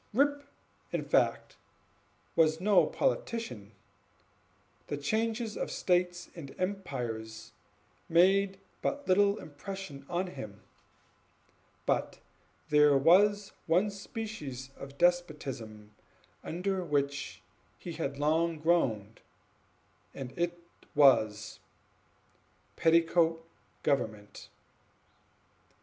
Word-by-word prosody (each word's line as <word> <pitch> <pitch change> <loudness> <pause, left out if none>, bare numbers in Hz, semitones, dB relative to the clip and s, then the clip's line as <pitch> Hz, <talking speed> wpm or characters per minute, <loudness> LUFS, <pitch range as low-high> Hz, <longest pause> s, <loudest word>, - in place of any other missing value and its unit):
Rip, 285 +4 +2 0.5
in - - -2
fact, - - +1 0.8
was 160 -1 +4
no 200 +3 +4
politician; 230 - -2 1.2
the 145 - -3
changes 220 - -1
of - - -3
states 180 -1 0
and 145 -6 -9
empires 125 - -4 0.6
made 195 +3 +4 0.2
but 285 0 -2
little 200 +2 +4
impression 150 -2 -8
on 180 +2 0
him; 105 - -9 1.2
but - - 0 0.5
there 150 -1 +6
was 200 +7 +4 0.2
one 180 +6 +3
species 195 - -6
of 140 0 -10
despotism 140 -12 -1 0.5
under 185 +2 -2
which 140 - -2 0.3
he 175 - -7
had 145 -4 -3
long 160 +3 +1
groaned, 125 -11 0 0.9
and 130 -2 -6
that 175 +4 -2 0.4
was 110 -7 +4 1.2
petticoat 165 0 +3 0.4
government. 110 -6 -2
165 Hz, 85 wpm, -31 LUFS, 135-195 Hz, 1.2 s, there